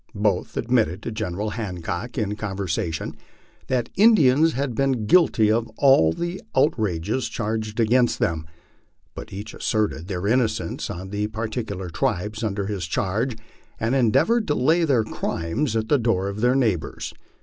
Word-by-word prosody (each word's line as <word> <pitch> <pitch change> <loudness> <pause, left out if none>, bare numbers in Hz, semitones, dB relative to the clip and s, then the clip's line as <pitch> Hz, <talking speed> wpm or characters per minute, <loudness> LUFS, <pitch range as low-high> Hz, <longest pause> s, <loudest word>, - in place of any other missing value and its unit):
Both 100 -3 0
admitted 110 -6 +1
to - - -4
General 105 -1 -3
Hancock 100 +2 -4
in 105 -3 -1
conversation 95 -6 -3 0.5
that 125 -3 0
Indians 165 - +5
had 135 0 -2
been 130 -2 0
guilty 110 -7 +4
of 115 +1 0
all 135 - +5
the 175 - -4
outrages 110 - +1
charged 110 0 -3
against 120 +2 +3
them, 80 -1 -1 0.7
but - - -9
each 100 +3 -7
asserted 105 -6 -1
the 95 -1 -3
innocence 120 0 0
of 95 +2 -6
the 105 0 -1
particular 110 -4 -4
tribes 105 +7 -2
under 100 -2 -1
his 95 -4 -3
charge, 110 +8 -1 0.4
and 115 +3 0
endeavored 135 - +3
to 150 - +1
lay 160 +7 +3
their 130 -7 +3
crimes 110 - -2
at 110 -1 0
the 145 - +3
door 100 -5 +1
of 100 +2 -5
their 125 +2 +3
neighbors. 110 - -1
110 Hz, 150 wpm, -23 LUFS, 100-125 Hz, 0.7 s, Indians